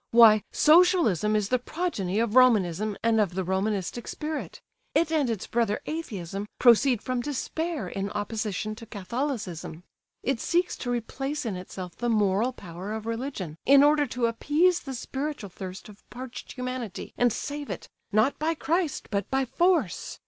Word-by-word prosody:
Why, 225 Hz, -2 st, +7 dB
Socialism 310 Hz, -, +4 dB
is 210 Hz, -1 st, 0 dB
the 255 Hz, -, +2 dB
progeny 235 Hz, -, -2 dB
of 230 Hz, 0 st, 0 dB
Romanism 215 Hz, -5 st, +4 dB
and 225 Hz, -1 st, +4 dB
of 185 Hz, -4 st, -1 dB
the 190 Hz, -, 0 dB
Romanistic 195 Hz, +4 st, -2 dB
spirit. 305 Hz, 0 st, -5 dB, 0.4 s
It 330 Hz, -1 st, +3 dB
and 300 Hz, -6 st, +2 dB
its 220 Hz, -4 st, -2 dB
brother 225 Hz, -3 st, 0 dB
Atheism 205 Hz, -, -4 dB
proceed 245 Hz, 0 st, +5 dB
from 255 Hz, -1 st, -1 dB
Despair 295 Hz, -, -3 dB
in 195 Hz, +2 st, -3 dB
opposition 210 Hz, 0 st, -3 dB
to 230 Hz, -, -10 dB
Catholicism. 200 Hz, -, -4 dB, 0.4 s
It 270 Hz, -2 st, 0 dB
seeks 350 Hz, +6 st, +1 dB
to 245 Hz, -, -5 dB
replace 270 Hz, +4 st, -3 dB
in 215 Hz, -5 st, -2 dB
itself 180 Hz, -1 st, -7 dB
the 240 Hz, 0 st, -1 dB
moral 210 Hz, +2 st, +2 dB
power 185 Hz, -3 st, -8 dB
of 220 Hz, 0 st, -5 dB
religion, 230 Hz, -, -4 dB
in 280 Hz, +1 st, +7 dB
order 295 Hz, 0 st, +4 dB
to 245 Hz, 0 st, -1 dB
appease 305 Hz, +10 st, +2 dB
the 270 Hz, -2 st, -6 dB
spiritual 270 Hz, -4 st, -4 dB
thirst 185 Hz, 0 st, -8 dB
of 210 Hz, -1 st, -14 dB
parched 250 Hz, 0 st, -8 dB
humanity 250 Hz, -5 st, -5 dB
and 245 Hz, -1 st, +3 dB
save 290 Hz, +5 st, -4 dB
it; -, -, -6 dB, 0.2 s
not 220 Hz, +6 st, +2 dB
by 320 Hz, +2 st, 0 dB
Christ, 325 Hz, +1 st, -1 dB
but 200 Hz, -2 st, -1 dB
by 265 Hz, 0 st, +1 dB
force. 325 Hz, -, +1 dB
235 Hz, 160 wpm, -27 LUFS, 205-280 Hz, 0.4 s, Why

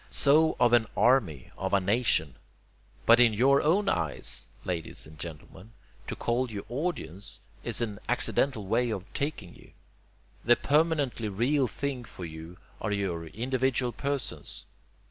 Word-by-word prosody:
So 155 Hz, +3 st, +4 dB
of 120 Hz, -1 st, +4 dB
an 115 Hz, -2 st, +4 dB
'army,' 105 Hz, -, +2 dB
of 95 Hz, +1 st, -2 dB
a -, -, +4 dB
'nation.' 100 Hz, -, +1 dB, 0.7 s
But 115 Hz, +1 st, +7 dB
in 120 Hz, -2 st, +6 dB
your 135 Hz, +5 st, +4 dB
own 190 Hz, +7 st, +2 dB
eyes, 80 Hz, -, -1 dB, 0.2 s
ladies 85 Hz, -3 st, -3 dB
and 75 Hz, 0 st, -14 dB
gentlemen, 85 Hz, +6 st, -9 dB, 0.3 s
to -, -, -4 dB
call 120 Hz, +2 st, -1 dB
you 105 Hz, -2 st, -6 dB
'audience' 120 Hz, -, -4 dB, 0.2 s
is -, -, +2 dB
an 105 Hz, -3 st, -3 dB
accidental 125 Hz, -2 st, +1 dB
way 120 Hz, +5 st, +1 dB
of 100 Hz, -4 st, -4 dB
taking 140 Hz, -, -3 dB
you. -, -, -18 dB, 0.7 s
The 120 Hz, +2 st, +6 dB
permanently 145 Hz, -6 st, +1 dB
real 125 Hz, +7 st, +1 dB
things 130 Hz, 0 st, -4 dB
for 90 Hz, -, -8 dB
you 80 Hz, +2 st, -9 dB, 0.2 s
are 105 Hz, -, -2 dB
your 90 Hz, -5 st, -2 dB
individual 125 Hz, +4 st, -1 dB
persons. 140 Hz, -1 st, -4 dB
120 Hz, 145 wpm, -28 LUFS, 95-135 Hz, 0.7 s, But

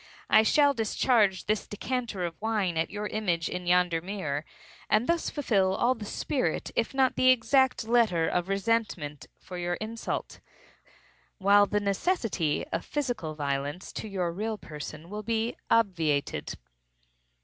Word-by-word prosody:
I 215 Hz, -, +8 dB
shall 285 Hz, +5 st, +4 dB
discharge 220 Hz, -4 st, +2 dB
this 215 Hz, 0 st, -1 dB
decanter 230 Hz, -3 st, -3 dB
of 170 Hz, +1 st, -7 dB
wine 210 Hz, -6 st, 0 dB
at 160 Hz, +1 st, 0 dB
your 210 Hz, +1 st, -4 dB
image 180 Hz, -7 st, -1 dB
in 180 Hz, 0 st, -5 dB
yonder 175 Hz, -2 st, +3 dB
mirror, 160 Hz, -6 st, -3 dB, 0.4 s
and 215 Hz, +3 st, +3 dB
thus 335 Hz, +2 st, 0 dB
fulfil 195 Hz, -10 st, +1 dB
all 245 Hz, +5 st, +3 dB
the 225 Hz, -4 st, -8 dB
spirit, 205 Hz, -, -2 dB
if 235 Hz, +3 st, 0 dB
not 265 Hz, -1 st, +3 dB
the 255 Hz, -, +4 dB
exact 255 Hz, +1 st, +3 dB
letter, 220 Hz, -9 st, +3 dB
of 180 Hz, +1 st, -1 dB
resentment 195 Hz, -8 st, -1 dB
for 180 Hz, -1 st, -8 dB
your 175 Hz, 0 st, -1 dB
insult, 220 Hz, +4 st, -5 dB, 1.0 s
while 205 Hz, +1 st, +5 dB
the 210 Hz, -, +1 dB
necessity 200 Hz, -, 0 dB
of 165 Hz, -, -1 dB
physical 245 Hz, -, -3 dB
violence 145 Hz, +3 st, -3 dB
to -, -, -5 dB
your 185 Hz, -4 st, -2 dB
real 215 Hz, +5 st, -3 dB
person 155 Hz, -1 st, -8 dB
will 210 Hz, 0 st, -4 dB
be 225 Hz, +2 st, -1 dB
obviated." 165 Hz, -10 st, +1 dB
205 Hz, 145 wpm, -28 LUFS, 175-230 Hz, 1.0 s, I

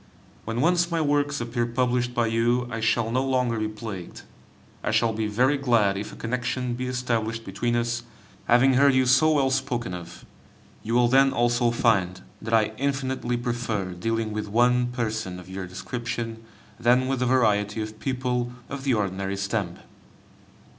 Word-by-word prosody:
When 115 Hz, +2 st, -2 dB
once 175 Hz, +2 st, +3 dB
my 165 Hz, -1 st, 0 dB
works 145 Hz, -1 st, +1 dB
appear 120 Hz, 0 st, -1 dB
published 125 Hz, 0 st, 0 dB
by 120 Hz, -, +2 dB
you, 120 Hz, +2 st, +1 dB
I 115 Hz, -, -3 dB
shall 115 Hz, 0 st, +1 dB
no 130 Hz, +2 st, +1 dB
longer 125 Hz, -4 st, 0 dB
be 110 Hz, -, 0 dB
plagued. 105 Hz, -4 st, -7 dB, 0.6 s
I -, -, -1 dB
shall 115 Hz, -1 st, +2 dB
be 110 Hz, 0 st, -1 dB
very 130 Hz, +7 st, +2 dB
glad 115 Hz, -7 st, +3 dB
if 100 Hz, +2 st, -5 dB
a -, -, -10 dB
connection 125 Hz, +1 st, -2 dB
be 125 Hz, +1 st, -3 dB
established 115 Hz, -3 st, -2 dB
between 120 Hz, +5 st, -1 dB
us, 120 Hz, 0 st, -1 dB, 0.4 s
having 125 Hz, +3 st, +5 dB
heard 140 Hz, +1 st, +5 dB
you 130 Hz, 0 st, +4 dB
so 145 Hz, +5 st, +5 dB
well 135 Hz, -3 st, +2 dB
spoken 130 Hz, -6 st, -1 dB
of. 85 Hz, 0 st, -9 dB, 0.6 s
You 115 Hz, +2 st, -2 dB
will 120 Hz, 0 st, +5 dB
then 135 Hz, +2 st, +5 dB
also 120 Hz, 0 st, +2 dB
find 105 Hz, -6 st, +1 dB, 0.2 s
that 110 Hz, -, -5 dB
I 110 Hz, -1 st, +2 dB
infinitely 130 Hz, -2 st, -1 dB
prefer 120 Hz, -6 st, -2 dB
dealing 115 Hz, +4 st, -2 dB
with 105 Hz, 0 st, -3 dB
one 125 Hz, +3 st, +3 dB
person 110 Hz, -6 st, -3 dB
of 90 Hz, -, -12 dB
your 95 Hz, 0 st, -6 dB
description 115 Hz, +3 st, -5 dB, 0.4 s
than 125 Hz, +2 st, +3 dB
with 135 Hz, -1 st, -1 dB
a 125 Hz, -, +2 dB
variety 105 Hz, -4 st, +2 dB
of 110 Hz, 0 st, -9 dB
people 125 Hz, -2 st, -2 dB, 0.2 s
of 140 Hz, -1 st, -6 dB
the 135 Hz, -3 st, +2 dB
ordinary 100 Hz, -1 st, -2 dB
stamp. 95 Hz, -2 st, -2 dB
120 Hz, 170 wpm, -25 LUFS, 110-125 Hz, 0.6 s, having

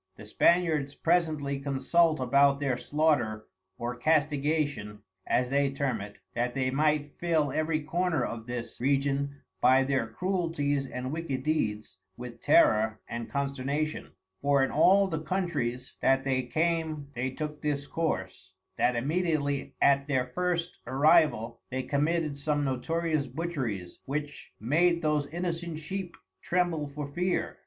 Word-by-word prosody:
The 105 Hz, -, -11 dB
Spaniards 155 Hz, +2 st, +2 dB
presently 155 Hz, -5 st, +1 dB
consult 155 Hz, +4 st, +2 dB
about 140 Hz, +2 st, +4 dB
their 135 Hz, -3 st, 0 dB
slaughter 125 Hz, -7 st, 0 dB, 0.3 s
or 120 Hz, +1 st, -3 dB
castigation 145 Hz, -6 st, 0 dB, 0.2 s
(as 125 Hz, +1 st, +1 dB
they 140 Hz, 0 st, +3 dB
term 135 Hz, -5 st, -2 dB
it) 105 Hz, +1 st, -9 dB, 0.2 s
that 120 Hz, +2 st, -1 dB
they 130 Hz, -1 st, 0 dB
might 150 Hz, +1 st, 0 dB
fill 160 Hz, -5 st, +1 dB
every 155 Hz, +2 st, 0 dB
corner 160 Hz, -3 st, 0 dB
of 115 Hz, 0 st, -6 dB
this 120 Hz, -1 st, -6 dB
Region 140 Hz, +1 st, 0 dB, 0.2 s
by 130 Hz, +1 st, +5 dB
their 130 Hz, -4 st, 0 dB
Cruelties 145 Hz, -2 st, -1 dB
and 125 Hz, +1 st, -4 dB
wicked 145 Hz, -5 st, -3 dB
Deeds 105 Hz, -10 st, -1 dB, 0.2 s
with 125 Hz, -1 st, -9 dB
terror 110 Hz, 0 st, +4 dB
and 115 Hz, 0 st, -5 dB
consternation; 140 Hz, +2 st, -2 dB, 0.3 s
for 140 Hz, -1 st, +3 dB
in 135 Hz, -, 0 dB
all 195 Hz, +6 st, +5 dB
the 160 Hz, -4 st, -3 dB
Countries 150 Hz, -8 st, -2 dB
that 135 Hz, 0 st, +3 dB
they 130 Hz, -1 st, +1 dB
came 160 Hz, -1 st, -1 dB
they 125 Hz, +2 st, -2 dB
took 150 Hz, +2 st, -5 dB
this 145 Hz, -1 st, -1 dB
course, 95 Hz, -, -3 dB, 0.2 s
that 125 Hz, -, +2 dB
immediately 145 Hz, +1 st, -1 dB
at 140 Hz, 0 st, +4 dB
their 130 Hz, -3 st, +1 dB
first 175 Hz, +5 st, -2 dB
arrival 140 Hz, -5 st, +3 dB
they 130 Hz, +1 st, -2 dB
committed 150 Hz, +2 st, 0 dB
some 145 Hz, +1 st, -1 dB
notorious 155 Hz, +3 st, -1 dB
butcheries, 130 Hz, -, -4 dB
which 145 Hz, +1 st, -5 dB
made 170 Hz, +8 st, +2 dB
those 150 Hz, -2 st, +1 dB
Innocent 170 Hz, 0 st, -3 dB
Sheep 180 Hz, +3 st, -5 dB, 0.2 s
tremble 175 Hz, -4 st, 0 dB
for 140 Hz, 0 st, -6 dB
fear. 180 Hz, +5 st, -2 dB
145 Hz, 135 wpm, -29 LUFS, 130-160 Hz, 0.3 s, by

